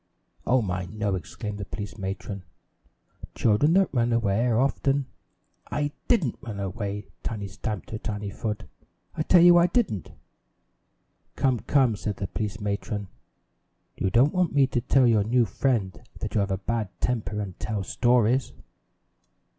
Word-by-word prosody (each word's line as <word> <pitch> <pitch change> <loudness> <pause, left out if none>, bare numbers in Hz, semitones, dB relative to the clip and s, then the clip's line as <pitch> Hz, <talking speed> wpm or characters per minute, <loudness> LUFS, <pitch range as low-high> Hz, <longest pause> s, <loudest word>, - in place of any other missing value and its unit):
"Oh, 125 -1 +4
my, 90 -2 -2
no!" 105 +1 -2
exclaimed 100 - -5
the 100 - -4
police 100 0 -6
matron. 95 0 -5 0.9
"Children 120 +9 +3
that 190 -4 +3
run 120 -2 +2
away 115 0 +2
are 115 -2 +2
often 135 +1 +1 0.3
" - - -47 0.3
"I 145 0 -1 0.2
didn't 175 - +2
run 110 -7 -6
away!" 100 +1 -4 0.2
Tiny 105 -3 -4
stamped 105 0 -5
her 110 - -4
tiny 105 -2 -4
foot. 105 +1 -4 0.5
"I 155 - -2
tell 170 +2 +6
you 175 0 +8
I 170 - +5
didn't." 180 - -1 1.2
"Come, 130 -3 +2
come," 125 0 +2
said 105 0 -4
the 100 - -3
police 105 +1 -4
matron, 100 -1 -3 0.9
"you 95 - 0
don't 125 +8 +4
want 180 -4 +1
me 140 -1 +6
to 125 -2 -1
tell 130 +2 +4
your 110 -4 +4
new 120 +3 +3
friend 105 -2 -1 0.2
that - - -5
you - - +2
have 100 0 0
a 95 - 0
bad 110 +1 -2
temper 105 -4 -1
and 100 -4 -5
tell 105 -2 -2
stories." 120 +5 +2
110 Hz, 160 wpm, -26 LUFS, 100-130 Hz, 1.2 s, you